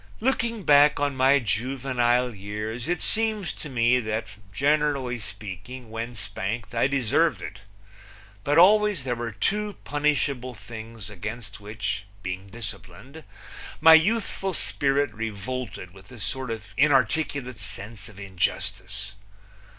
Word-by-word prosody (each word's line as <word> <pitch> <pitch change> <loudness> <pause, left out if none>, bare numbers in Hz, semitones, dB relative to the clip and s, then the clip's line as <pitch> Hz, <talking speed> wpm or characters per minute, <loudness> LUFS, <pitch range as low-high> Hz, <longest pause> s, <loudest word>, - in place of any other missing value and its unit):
Looking 235 -3 0
back 145 -1 +6
on 145 -1 0
my 130 +2 +5
juvenile 125 +1 +1
years 105 +5 -5
it 175 -1 0
seems 220 -5 +2
to 150 - -7
me 125 0 +3
that, 110 -1 -2 0.3
generally 140 -1 +1
speaking, 105 +4 -8
when 115 +2 -5
spanked 105 +2 -4
I 115 +2 +3
deserved 140 - +1
it. - - -7 0.8
But 145 +5 +2
always 205 -2 +6
there 130 -2 -1
were 120 -1 -4
two 210 - -1
punishable 140 -4 0
things 110 -1 -8
against 105 +2 -6
which 105 0 -4 0.2
being 95 +1 -4
disciplined 115 - -8 0.6
my 160 +1 +9
youthful 195 +1 +3
spirit 140 -5 +1
revolted 110 -2 -5
with 95 +2 -15
a 125 - -10
sort 125 +6 -2
of 110 -3 -6
inarticulate 135 -2 +2
sense 100 +2 -5
of 100 -2 -14
injustice. 95 +1 -2
120 Hz, 125 wpm, -26 LUFS, 105-145 Hz, 0.8 s, my